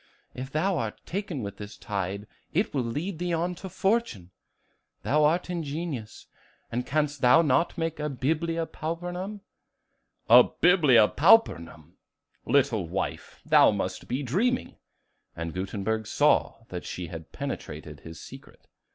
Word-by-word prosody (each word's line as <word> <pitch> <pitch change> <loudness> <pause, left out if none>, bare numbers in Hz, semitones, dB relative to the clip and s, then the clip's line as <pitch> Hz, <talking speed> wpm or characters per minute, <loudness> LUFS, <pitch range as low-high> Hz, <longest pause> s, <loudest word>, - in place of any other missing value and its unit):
If 130 +2 -7
thou 175 +3 0
art 110 -4 -4
taken 180 - -4
with 100 -1 -6
this 105 0 -9
tide, 100 -1 -4 0.3
it 195 +6 +1
will 135 - +1
lead 155 +9 -4
thee 175 -1 -1
on 170 +2 0
to 190 +2 -8
fortune. 190 - -1 0.7
Thou 150 +2 +2
art 170 +4 +1
ingenious; 155 -8 -5 0.5
and 125 +2 -3
canst 150 -1 -1
thou 130 +7 +6
not 155 +4 +1
make 165 -2 -2
a 150 0 -2
'Biblia 160 +5 -1
Pauperum?'" 175 +6 -5 0.9
"A - - +9
'Biblia 150 - +4
Pauperum!' 90 - +2 0.5
Little 125 -10 +2
wife, 95 +2 -4
thou - - +6
must - - -3
be 130 +3 -2
dreaming." 220 - 0 0.6
And 85 -1 -5
Gutenberg 105 +3 -3
saw 145 -3 +2
that 90 -1 -6
she 90 - -5
had 80 -1 -9
penetrated - - -6
his 80 0 -11
secret. - - -13
145 Hz, 135 wpm, -27 LUFS, 105-170 Hz, 0.9 s, A